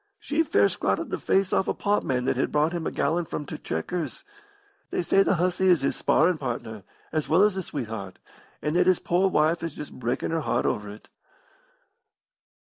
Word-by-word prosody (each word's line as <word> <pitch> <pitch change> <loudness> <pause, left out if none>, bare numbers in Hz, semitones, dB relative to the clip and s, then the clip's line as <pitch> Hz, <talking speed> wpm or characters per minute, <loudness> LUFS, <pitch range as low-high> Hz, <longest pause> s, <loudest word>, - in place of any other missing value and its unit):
She 295 +3 0
fair 325 - +3
scratted - - -1
the - - -2
face 195 -1 +1
off 190 - +2
a - - 0
potman 135 -11 0
that 130 - +1
had 130 - 0
brought 150 +3 +2
him 170 -2 -2
a - - -2
gallon 165 +4 0
from 150 - -5
t' - - -7
'Chequers.' 165 - -4 0.7
They - - -1
say 195 - +4
the 195 - +3
hussy 180 +2 +1
is 175 -6 +5
his 135 - 0
sparrin' 170 -2 +2
partner, 115 -5 -4 0.3
as 155 -1 -2
well 170 +5 +5
as 210 -1 +4
his 190 -2 -5
sweetheart, 110 -8 -5 0.5
and 150 +2 -1
that 180 +1 +3
his 185 -2 +5
poor 180 +3 +1
wife 160 0 +2
is 165 -2 -4
just 150 - -8
breakin' 125 +4 -2
her 165 -1 0
heart - - 0
over 105 -1 -1
it. 105 +1 -12
160 Hz, 195 wpm, -26 LUFS, 130-180 Hz, 0.7 s, is